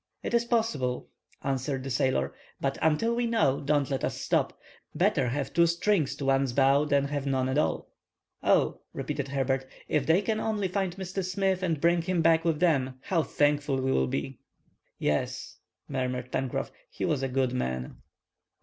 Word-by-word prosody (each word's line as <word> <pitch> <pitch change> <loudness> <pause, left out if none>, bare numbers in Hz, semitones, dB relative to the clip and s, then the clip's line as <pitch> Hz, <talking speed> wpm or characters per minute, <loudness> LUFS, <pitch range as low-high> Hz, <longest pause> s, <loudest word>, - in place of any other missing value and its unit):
"It - - -3
is 235 0 +3
possible." 185 - 0 0.3
answered 135 0 -1
the 135 - -5
sailor, 130 +2 +1 0.3
"but, 135 0 -1
until 160 +10 +2
we 240 0 0
know, 220 - +2
don't 145 -1 +1
let 135 - -1
us - - -2
stop. - - 0 0.4
Better 165 -6 +2
have 135 +2 -2
two 170 0 +5
strings 170 -4 +1
to 140 - -5
one's 135 -2 +2
bow 140 +2 +4
than 140 -1 +2 0.2
none 130 -1 +1
at 130 +3 +1
all!" - - -1 0.5
"Oh," - - +2
repeated 140 -1 -3
Herbert, 135 -1 -1 0.2
"if 145 -3 0
they 175 +5 +4
can 215 +1 0
only 215 -3 0
find 190 -2 -1
Mr. 190 0 -3
Smith, 190 0 0
and 165 -5 0
bring 170 +2 +3
him 175 -1 0
back 165 0 +4
with 165 -3 +1
them, 135 -7 +2
how 170 -4 +1
thankful 145 -2 +1
we 130 0 0
will 65 - +2
be!" 65 +1 -3 0.6
"Yes," 75 -1 -2 0.3
murmured 125 -2 -3
Pencroff. 130 -2 -2 0.2
"He - - -4
was 145 -3 0
a 135 - 0
good 130 -1 0
man." 65 - -3
145 Hz, 175 wpm, -28 LUFS, 130-175 Hz, 0.6 s, two